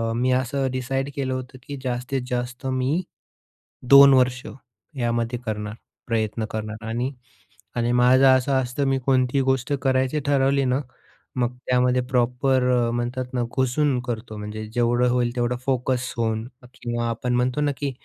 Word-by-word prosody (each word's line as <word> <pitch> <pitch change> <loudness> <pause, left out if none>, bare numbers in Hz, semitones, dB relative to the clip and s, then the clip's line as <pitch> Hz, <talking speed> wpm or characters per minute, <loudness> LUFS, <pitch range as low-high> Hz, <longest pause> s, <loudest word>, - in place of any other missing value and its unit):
मी 125 +2 +1
असं 135 +1 -1
डिसाईड 135 +2 -2
केलं 135 -3 -2
होतं, 130 0 -6
की 145 -1 -5
जास्तीत 125 +1 -2
जास्त 125 +2 -4
मी 130 +6 0 0.9
2 140 0 +10
वर्ष 130 -1 +2 0.5
यामध्ये 120 0 -1
करणार, 105 -1 -3 0.3
प्रयत्न 110 -1 -1
करणार 110 0 -5
आणि 120 +4 -2 0.6
आणि 120 0 0
माझं 125 +2 +5
असं 130 +1 +4
असतं 130 +3 -2
मी 135 - +2
कोणतीही 130 0 +2
गोष्ट 130 +1 0
करायची 130 +2 +1
ठरवली 140 -1 +2
ना, 130 +1 +1 0.6
मग 125 -1 -1
त्यामध्ये 125 0 +3
प्रॉपर 125 +1 +2
अ, 120 -2 +2
म्हणतात 120 +2 -2
ना 125 -1 0
घुसून 130 +1 +1
करतो. 115 -2 -5
म्हणजे 105 +1 -6
जेवढं 120 +1 +2
होईल 120 -1 0
तेवढं 120 0 0
फोकस 130 -1 0
होऊन 110 -1 -1 0.3
किंवा 120 -1 -3
आपण 125 +2 -2
म्हणतो 125 +3 0
ना 145 -1 +2
की 140 +1 -2
125 Hz, 150 wpm, -23 LUFS, 120-130 Hz, 0.9 s, 2